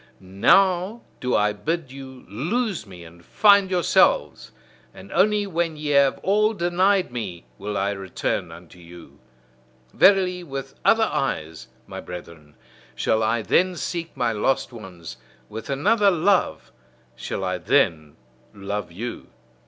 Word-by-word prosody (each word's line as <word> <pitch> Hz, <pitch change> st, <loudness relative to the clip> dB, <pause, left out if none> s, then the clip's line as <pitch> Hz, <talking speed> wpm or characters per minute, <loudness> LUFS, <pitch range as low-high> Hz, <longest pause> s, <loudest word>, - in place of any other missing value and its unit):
Now 185 Hz, -, +2 dB, 0.2 s
do 125 Hz, 0 st, -1 dB
I 105 Hz, 0 st, +2 dB
bid 155 Hz, +5 st, -3 dB
you 130 Hz, -1 st, -11 dB
lose 175 Hz, -, -2 dB
me 90 Hz, -3 st, -12 dB
and 85 Hz, +1 st, -15 dB
find 200 Hz, -, +4 dB
yourselves; 190 Hz, -, +2 dB, 0.4 s
and -, -, -13 dB
only 210 Hz, -1 st, +2 dB
when 170 Hz, -4 st, -2 dB
ye 150 Hz, 0 st, -4 dB
have 140 Hz, -1 st, +4 dB
all 215 Hz, +3 st, +2 dB
denied 185 Hz, 0 st, +1 dB
me, 100 Hz, -8 st, -6 dB
will 100 Hz, +1 st, -4 dB
I 100 Hz, +1 st, 0 dB
return 95 Hz, -3 st, -3 dB
unto 90 Hz, -, -14 dB
you. 85 Hz, 0 st, -14 dB, 0.7 s
Verily, 185 Hz, -2 st, +4 dB
with 135 Hz, -3 st, -7 dB
other 225 Hz, 0 st, +4 dB
eyes, 80 Hz, -, -3 dB, 0.2 s
my -, -, -8 dB
brethren, 85 Hz, -4 st, -11 dB, 0.4 s
shall 110 Hz, -, 0 dB
I 110 Hz, +1 st, 0 dB
then 185 Hz, -, +2 dB
seek 170 Hz, -3 st, -5 dB
my 120 Hz, -2 st, +1 dB
lost 135 Hz, +4 st, -1 dB
ones; 90 Hz, -, -10 dB, 0.3 s
with 110 Hz, +4 st, -8 dB
another 200 Hz, +10 st, +3 dB
love 185 Hz, +2 st, +1 dB, 0.4 s
shall 95 Hz, -, -5 dB
I 90 Hz, -1 st, -2 dB
then 80 Hz, -, +1 dB, 0.4 s
love 100 Hz, -1 st, -5 dB
you. 115 Hz, +8 st, -7 dB
135 Hz, 135 wpm, -23 LUFS, -, 0.7 s, find